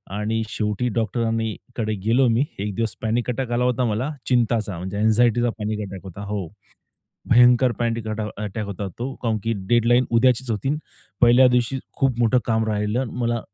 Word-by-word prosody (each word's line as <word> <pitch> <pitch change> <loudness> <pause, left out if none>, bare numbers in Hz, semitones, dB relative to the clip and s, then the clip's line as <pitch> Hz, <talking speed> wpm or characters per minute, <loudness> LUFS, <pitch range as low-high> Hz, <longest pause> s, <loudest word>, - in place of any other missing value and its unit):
आणि 110 +2 -1
शेवटी 105 +3 -1
डॉक्टरांनी 115 -1 -1 0.2
कडे 110 -2 -1
गेलो 125 +3 +4
मी. 115 +5 +3 0.2
एक 100 0 -3
दिवस 115 -1 -2
पॅनिक 115 +2 -1
अटॅक 125 0 -3
आला 120 +1 +1
होता 125 0 +1
मला, 115 +6 -1 0.2
चिंताचा 115 -6 +1
म्हणजे 95 +3 -5
अँनक्झाइटीचा 120 +2 +3
पॅनिक 105 0 -2
अटॅक 95 -1 -8
होता. 95 +1 -9
हो. 100 -4 -3 0.8
भयंकर 125 +1 +6
पॅनडिक 115 -2 -1
अटॅा 110 0 -3 0.2
अटॅक 105 +1 -4
होता 100 0 -5
तो. 130 +2 -4
काऊनकी 115 -1 -1 0.2
डेडलाईन 120 +1 +3
उद्याचीच 125 +1 +2
होती, 125 +7 -1 0.5
पहिल्या 120 +2 +7
दिवशी 125 +2 +1 0.2
खूप 130 -3 +1
मोठं 120 +2 +4
काम 110 -1 +1
राहिलं. 105 +4 0 0.2
मला 120 0 0
115 Hz, 165 wpm, -23 LUFS, 105-120 Hz, 0.8 s, पहिल्या